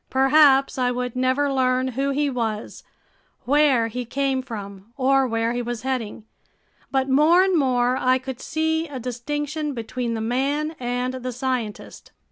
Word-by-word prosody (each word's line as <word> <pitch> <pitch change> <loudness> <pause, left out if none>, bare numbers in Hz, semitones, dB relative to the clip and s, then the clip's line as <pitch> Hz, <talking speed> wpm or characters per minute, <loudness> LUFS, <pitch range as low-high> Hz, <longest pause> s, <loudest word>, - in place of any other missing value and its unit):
Perhaps 270 0 +4
I 250 -1 +2
would 250 0 -3
never 260 +3 +1
learn 255 0 +1
who 270 +3 -1
he 290 +1 0
was, 225 -5 -3 0.6
where 275 -3 +3
he 250 +2 -4
came 270 +2 -1
from 205 -4 -9
or 270 0 +3
where 230 0 -1
he 245 - -2
was 240 -1 -5
heading, 250 -5 -3 0.7
but 265 -1 0
more 305 +7 +5
and 380 -1 +1
more 255 -4 +2
I 255 0 +3
could 260 -1 -7
see 320 +1 -1
a 275 -3 -7
distinction 295 +5 -4
between 235 0 -3
the - - -3
man 280 +7 -1
and 245 +1 -2
the 255 0 -5
scientist. 250 -4 -4
255 Hz, 155 wpm, -23 LUFS, 245-275 Hz, 0.7 s, more